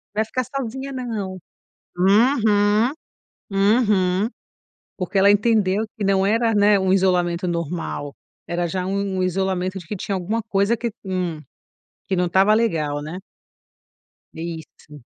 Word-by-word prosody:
"Vai 220 +1 +1
ficar 255 +3 -2
sozinha, 265 +1 -5
não". 220 -8 -4 0.6
Uhum, 210 +2 +3 0.6
uhum. 200 -1 +2 0.7
Porque 185 +1 -2
ela 200 +1 +6
entendeu 210 -1 +2
que 210 - -3
não 195 -1 +2
era, 225 +2 +2
né, 205 -1 +4
um 190 0 +2
isolamento 180 -2 +1
normal. 170 -4 -4 0.3
Era 175 0 -1
já 180 +2 -3
um 195 0 -2
um - - +1
isolamento 185 0 -1
de 175 - -12
que 210 - -4
tinha 195 +1 -3
alguma 200 +5 -2
coisa 210 +1 +1
que, 235 0 -3
hum, 180 -4 -2 0.7
que 190 - -1
não 180 0 +1
estava 190 +4 +4
legal, 155 -10 0
né? 155 +5 -6 1.2
Isso. 160 -3 -9
195 Hz, 135 wpm, -22 LUFS, 180-215 Hz, 1.2 s, ela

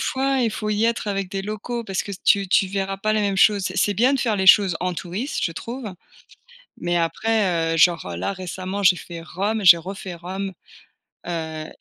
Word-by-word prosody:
fois 265 0 0
et 235 - +2
faut 215 0 -4
y 210 +1 +1
être 230 -1 0
avec 195 -2 -2
des 195 -1 -3
locaux, 215 +3 -5
parce 195 -3 -2
que 200 - -7
tu 200 -1 +3
tu 190 - +3
verras 195 0 -3
pas 215 +2 -1
les 215 - +1
mêmes 200 -2 0
choses. 200 0 +4
C'est 185 +1 -4
c'est 205 - +2
bien 245 +7 +3
de 275 - 0
faire 225 -4 0
les 190 -1 -1
choses 190 -2 +7
en 180 0 -1
touriste, 190 - -4
je 165 - -1
trouve 240 +9 -7 0.9
mais 175 0 -1
après, 175 -1 0
heu, - - 0
genre, 170 0 +4
heu, 85 - -5
là, 90 - -2
récemment, 185 +1 -5
j'ai 190 -2 +5
fait 170 -1 -9
Rome, 200 +6 -2
j'ai 175 -2 +9
refait 185 +1 -7
Rome, 190 +3 -5 0.8
heu, 160 -2 -4
195 Hz, 215 wpm, -22 LUFS, 175-215 Hz, 0.9 s, j'ai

